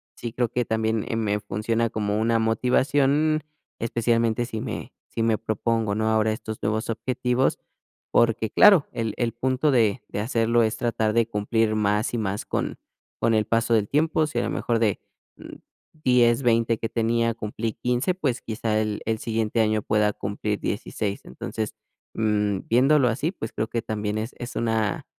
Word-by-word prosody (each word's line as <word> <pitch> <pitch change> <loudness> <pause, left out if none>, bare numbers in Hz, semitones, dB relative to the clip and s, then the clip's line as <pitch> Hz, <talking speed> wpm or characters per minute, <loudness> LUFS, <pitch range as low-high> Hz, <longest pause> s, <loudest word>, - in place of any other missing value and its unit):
sí 120 - -5
creo 120 +1 0
que 125 0 0
también 110 -1 0
eh 115 - -1
me 105 -2 0
funciona 115 +3 -1
como 105 -1 -1
una 115 0 +2
motivación, 140 +6 +2 0.4
especialmente 115 0 +1
si 110 -3 -5
me 120 0 -6 0.2
si 115 - -1
me 115 -2 +2
propongo, 110 -1 -1
¿no?, 110 +1 0
ahora 110 0 +2
estos 110 0 -7
nuevos 110 +2 -1
objetivos, 125 +2 0 0.5
porque 115 -2 +2
claro, 195 -8 +6
el 115 -2 -2
el 120 -2 0
punto 130 +4 +1
de 110 -6 +2
de - - -4
hacerlo 115 +1 +2
es 110 0 0
tratar 115 -3 0
de 115 0 +3
cumplir 110 0 0
más 105 +1 +1
y 120 - 0
más 100 -2 -2
con - - -2 0.4
con 115 - +2
el 110 -1 +3
paso 115 +1 +1
del 105 -2 +2
tiempo. 155 +1 +2
Si 155 - -2
a - - 0
lo - - -2
mejor 115 -1 0
de, 105 -4 +1 0.4
mm, - - -10 0.5
10, 125 0 +4
20 115 -1 +2
que 115 - -3
tenía, 115 0 +1
cumplí 110 0 -4
15, 125 +8 0
pues 140 -9 -2
quizá 110 -1 -1
el 105 -1 -2
el 110 0 0
siguiente 115 0 0
año 110 -1 +1
pueda 105 0 +2
cumplir 105 +1 -3
16. 100 -1 -3
Entonces, 110 - -5 0.4
mm, 105 -3 +1
viéndolo 130 +3 +4
así, 140 +9 -1
pues 115 - -6
creo 110 - -2
que 115 - -2
también 105 -1 -3
es 110 +3 -4
es 120 0 -7
una 115 -2 0
115 Hz, 175 wpm, -24 LUFS, 110-120 Hz, 0.5 s, claro